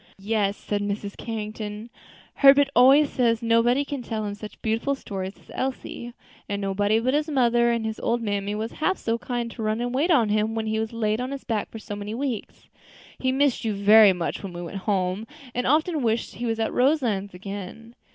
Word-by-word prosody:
"Yes," 205 0 0
said 205 -1 -3
Mrs. 205 0 -3
Carrington, 215 0 -6 0.5
"Herbert 280 0 +7
always 270 +4 +7
says 235 -2 +1
nobody 235 +4 +3
can 280 -2 -4
tell 220 -2 -3
him 205 - -3
such 210 +1 -10
beautiful 230 +5 0
stories 195 -6 -6
as - - -18
Elsie; 250 -2 -4 0.4
and 200 0 -2
nobody 205 +2 +1
but 255 +3 0
his 300 +2 +1
mother 240 -4 +3
and 235 -1 0
his 220 0 -4
old 240 - 0
mammy 205 -2 -2
was 220 +2 -3
half 375 +5 0
so 230 0 -2
kind 240 -1 -3
to 230 - -8
run 215 +1 0
and 245 +1 -2
wait 290 +7 +1
on 245 -11 +4
him 215 +1 +1
when 225 -1 -2
he 220 0 -1
was 220 0 -2
laid 220 0 -1
on 255 - -3
his 275 0 -6
back 220 -4 -2
for - - -9
so 205 -1 -7
many 205 +2 -5
weeks. 255 -4 -4 0.5
He 260 - +1
missed 275 -1 +1
you 220 -2 -1
very 205 +1 +7
much 175 -2 -3
when 195 -3 -7
we 175 0 -6
went 175 +3 -6
home, 190 +2 0 0.3
and 250 - -1
often 310 +3 +2
wished 230 -1 0
he 240 - -4
was 225 0 -1
at 225 - -1
Roselands 240 - +1
again." 200 +4 -8
225 Hz, 210 wpm, -25 LUFS, 205-250 Hz, 0.5 s, Herbert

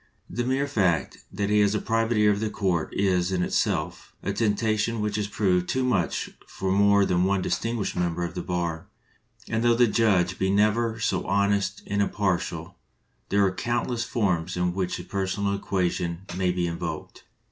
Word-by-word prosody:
The 120 - -3
mere 135 +3 0
fact 95 -11 0
that 100 +1 -2
he 105 - +4
has 105 0 +3
the 105 - +1
private 115 +1 0
ear 105 -1 +5
of 100 - 0
the 110 0 -1
court 90 -6 -1
is, 95 -2 +1
in 90 -1 +1
itself, - - -1
a - - -1
temptation 110 +1 0
which 105 -1 -1
has 105 -1 -1
proved 90 -4 +1
too 130 - 0
much 100 -9 0 0.2
for 95 0 -3
more 100 0 +4
than 90 -1 +2
one 95 -1 +1
distinguished 115 -3 -2
member 85 -1 -1
of 85 - -6
the 90 - -4
bar; 85 -2 -3 0.6
and 110 - -1
though 120 0 +4
the 120 +1 +5
judge 100 -6 +2
be 95 - +1
never 110 +3 +2
so 95 -3 -1
honest 100 +1 +1
and 100 0 0
impar 100 -3 +1
tial, 85 +2 -6 0.6
there 100 0 +3
are 95 - +2
countless 120 +3 -1
forms 90 -7 -1
in 90 0 0
which 90 -1 -2
the 90 - -7
per 95 +1 -2
sonal 100 +1 -1
equation 90 -3 -1
may 90 -1 +1
be 90 -1 -1
invoked. 85 -2 -5
100 Hz, 190 wpm, -26 LUFS, 90-110 Hz, 0.6 s, ear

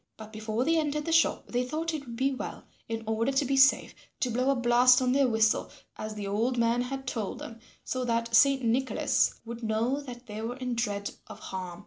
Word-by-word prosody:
But 220 0 -11
before 220 +3 -2
they 330 +1 +3
entered 300 -1 -2
the 330 - -2
shop 330 0 +2
they 245 +1 0
thought 315 +5 -3
it 305 -3 -4
would 235 - -7
be 270 +3 +1
well, 260 - -6 0.3
in 225 0 -3
order 220 +4 0
to 270 +1 +2
be 275 +1 0
safe, 270 +1 +4 0.3
to 250 - 0
blow 255 +3 +1
a 275 - +3
blast 245 +1 +5
on 255 -1 +1
their 275 0 +3
whistle 220 -2 +2 0.3
as 215 0 -6
the 205 -1 -5
old 225 +6 0
man 235 +1 +2
had 265 +2 -5
told 215 -5 -3
them 230 0 -9 0.2
so 255 0 -3
that 230 -1 -1
Saint 270 +2 +5
Nicholas 250 +3 +1
would 235 +1 -7
know 225 +5 0
that 250 -3 -10
they 215 -2 -7
were 235 +2 -4
in 255 -2 -3
dread 205 -4 -2 0.2
of - - -10
harm. 180 -2 -6
245 Hz, 225 wpm, -28 LUFS, 225-270 Hz, 0.3 s, blast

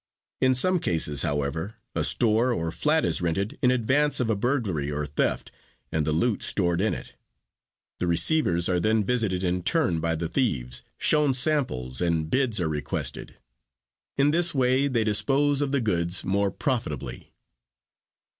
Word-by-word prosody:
In 130 0 +3
some 180 +8 +2
cases, 75 - 0
however, 75 +7 -2 0.2
a - - -1
store 115 +2 +2
or 85 -8 -2
flat 155 - +1
is - - +1
rented 90 +5 -2
in 125 - +3
advance 130 +4 +2
of 115 -3 0
a - - +1
burglary 100 - -1
or 75 0 -2
theft 70 0 -2 0.4
and 80 -1 -1
the - - +1
loot 100 +8 0
stored 85 -2 +1
in 110 - 0
it. - - -10 0.9
The 90 - -1
receivers 85 - +2
are 90 -1 +1
then 110 +4 +1
visited 100 -5 -1
in 90 0 -1
turn 95 - +1
by 80 0 -1
the 80 +1 -3
thieves, 65 - -1 0.2
shown 150 -3 +2
samples, 125 - 0
and 85 -2 -1
bids 130 -6 +2
are 85 - 0
requested. 75 -2 -3 0.8
In 140 +1 +3
this 170 0 +2
way 130 +1 +2
they 120 -5 0
dispose 135 +7 +2
of 140 -2 -1
the 140 -2 +1
goods 90 -5 0
more 100 +1 0
profitably. 115 - -4
105 Hz, 160 wpm, -25 LUFS, 85-130 Hz, 0.9 s, In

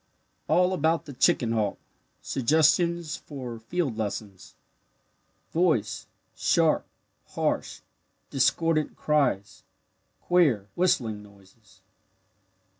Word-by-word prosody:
ALL 180 +1 +3
ABOUT 165 -1 +1
THE 145 - -9
CHICKEN 120 -2 +2
HAWK 110 -3 0 0.5
SUGGESTIONS 160 +4 +2
FOR 125 -5 -8
FIELD 130 -1 -2
LESSONS 100 -2 -5 1.0
Voice 120 - 0 0.3
sharp, - - +2 0.5
harsh, - - -2 0.5
discordant 150 +3 +1
cries 140 -10 0 0.6
queer 140 - +2
"whistling" 120 - +1
noises. 100 -1 -20
135 Hz, 80 wpm, -26 LUFS, 110-165 Hz, 1.0 s, ALL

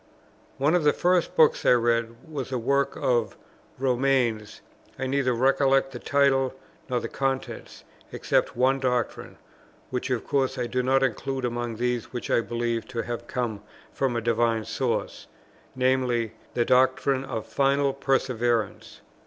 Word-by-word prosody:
One 145 +4 +2
of 180 -2 +2
the 150 - +4
first 180 -1 +1
books 155 -2 +4
I - - +5
read 115 +2 0
was 140 -4 -5
a 130 - 0
work 140 +3 0
of 120 -3 0 0.4
Romaine's; 125 -4 0 0.4
I 130 - -3
neither 130 -1 +1
recollect 135 +2 +3
the - - -7
title 135 -2 +2 0.3
nor 125 -1 +1
the - - -4
contents, 135 -1 -4 0.3
except - - 0
one 130 +2 +3
doctrine, 125 -2 -2 0.5
which 125 +1 -3
of 125 -3 -1
course 135 -1 0
I 125 - -1
do 125 +2 -1
not 135 +1 +2
include 130 +1 -2
among 120 -1 -3
those 120 0 -1
which 120 - -6
I - - +4
believe 115 -1 -2
to 115 -2 -3
have 120 0 -5
come 120 -5 -3 0.3
from 130 -3 0
a 115 - 0
divine 115 -1 +1
source, - - -3 0.5
viz. 125 -3 +1 0.2
the 120 - +2
doctrine 130 +1 +2
of 110 -5 -5
final 140 0 +1
perseverance. 125 -4 -1
125 Hz, 150 wpm, -26 LUFS, 120-135 Hz, 0.5 s, I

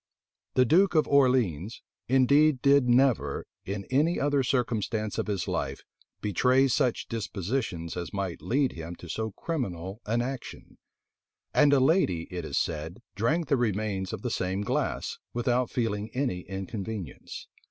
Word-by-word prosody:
The 130 - +5
duke 175 +7 +4
of 155 - +4
Orleans 125 - +2 0.2
indeed 135 +2 +4
did 140 -3 +5
never, 120 - +2 0.2
in 100 0 -4
any 155 +6 +2
other 145 -1 +2
circumstance 115 -4 -1
of - - -2
his 100 -4 -2
life, - - -3 0.4
betray 125 +7 +3
such 125 0 +1
dispositions 100 -5 -3
as 90 -1 -5
might 95 -4 -3
lead 135 +1 +1
him 85 +1 -7
to 90 - -11
so 110 +7 -2
criminal 100 - -4
an 115 +2 +1
action; 130 0 -7 0.7
and 145 -1 +5
a 140 - +5
lady, 130 - +3
it 90 -1 -4
is - - -3
said, 80 +7 -3
drank 155 +10 0
the 140 - +3
remains 105 -4 -1
of 110 -3 -6
the 125 - -2
same 95 0 -1
glass, 105 - -2 0.2
without 120 0 +1
feeling 110 -3 -2
any 125 -9 0
inconvenience. 95 - -6
115 Hz, 145 wpm, -28 LUFS, 95-135 Hz, 0.7 s, The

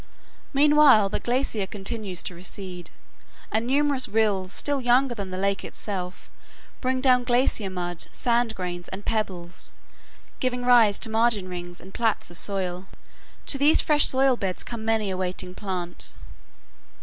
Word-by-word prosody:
Meanwhile, 285 -7 +5
the - - -2
glacier 240 -5 -1
continues 200 -2 -5
to - - -4
recede, 180 -1 -7 0.6
and 225 +2 0
numerous 280 0 +4
rills, 205 -4 0
still 285 +4 -1
younger 250 +1 +3
than 200 -4 -6
the 185 - -5
lake 200 +1 -1
itself, 185 -3 -6 0.5
bring 255 0 -1
down 255 -2 +4
glacier 240 -4 +1
mud, 175 -2 -4
sand 235 -2 0
grains, 175 -1 -5
and 195 +2 -8
pebbles, 185 -5 -4 0.7
giving 250 -1 -2
rise 230 -5 +5
to 225 - -3
margin 220 -4 +1
rings 175 -1 -7
and 190 +1 -14
plats 225 -6 -1
of 175 - -5
soil. 190 -2 -2 0.6
To 275 - +3
these 290 +3 +7
fresh 295 -1 +5
soil 265 -1 +3
beds 190 -4 -3
come 230 -2 -7
many 220 -3 0
a 185 - -3
waiting 180 0 -3
plant. 185 -3 -3
210 Hz, 150 wpm, -25 LUFS, 185-245 Hz, 0.7 s, these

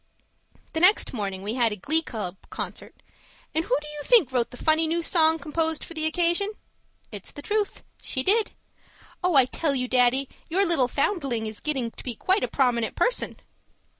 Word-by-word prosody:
The 320 - 0
next 365 -1 +4
morning 195 -4 -4
we 210 +2 -3
had 235 -3 +2
a - - -3
glee 310 - +1
club 210 - -6
concert - - -7 0.5
and 320 - 0
who - - +1
do 300 - -11
you 300 0 -6
think 385 - +5
wrote 245 -2 0
the 245 - -12
funny 315 +2 +3
new 335 +1 -1
song 320 -1 +4
composed 320 0 -1
for - - -8
the 315 -1 +1
occasion? 345 +5 +2 0.6
It's 205 -3 -8
the 290 - -10
truth. 420 +1 -2 0.2
She 260 - -2
did. 430 +5 +2 0.7
Oh, 360 -3 +2
I 265 -2 +7
tell 280 +3 -1
you, 250 -1 -1
Daddy, 255 +2 +3 0.2
your 380 +4 +2
little 330 -8 +2
foundling 275 - -1
is 215 -1 -6
getting 265 -6 -2
to - - -12
be 245 -3 -4
quite 380 - +1
a - - +1
prominent 245 -4 0
person! - - 0
300 Hz, 190 wpm, -25 LUFS, 245-335 Hz, 0.7 s, I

